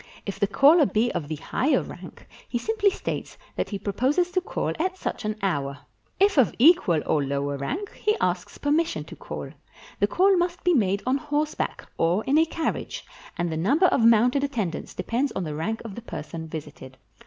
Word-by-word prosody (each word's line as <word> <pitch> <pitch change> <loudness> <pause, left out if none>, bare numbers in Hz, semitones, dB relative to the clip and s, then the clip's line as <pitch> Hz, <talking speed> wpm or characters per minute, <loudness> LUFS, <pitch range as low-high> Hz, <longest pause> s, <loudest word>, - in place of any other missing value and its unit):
If 200 - -5
the 200 - +2
caller 290 - +6
be 220 +5 +1
of 150 - -3
the 155 - -3
higher 260 - 0
rank, - - -11 0.2
he 240 - -1
simply 425 - +2
states 390 - -5 0.2
that - - -2
he 205 - -3
proposes 270 - 0
to 370 - +1
call - - -2
at 370 +3 -1
such 240 - -4
an 215 0 -1
hour; 140 -7 -1 0.4
451 - - -13
PERSIA - - +9
if 405 -5 -1
of - - -16
equal 240 - +5
or 150 - +1
lower 140 +1 -2
rank, 320 - -4
he 425 +1 0
asks - - -1
permission 310 +3 0
to - - -11
call. - - -7 0.5
The - - +3
call 385 +2 +4
must 350 0 -1
be 360 - +4
made 200 - +1
on 255 +2 +2
horseback 295 +2 -2
or 175 +6 +2
in 285 +3 +3
a 325 - +5
carriage, 325 0 -3 0.3
and 175 -1 -1
the 160 - -2
number 275 - +3
of 290 - +3
mounted 235 +4 +5
attendants 220 -12 -3
depends 255 +4 -1
on 190 - -2
the 155 -3 -4
rank 200 +9 -3
of 215 - -6
the 235 - -8
person 160 -6 -7
visited. 145 -4 -9
235 Hz, 200 wpm, -25 LUFS, -, 0.5 s, PERSIA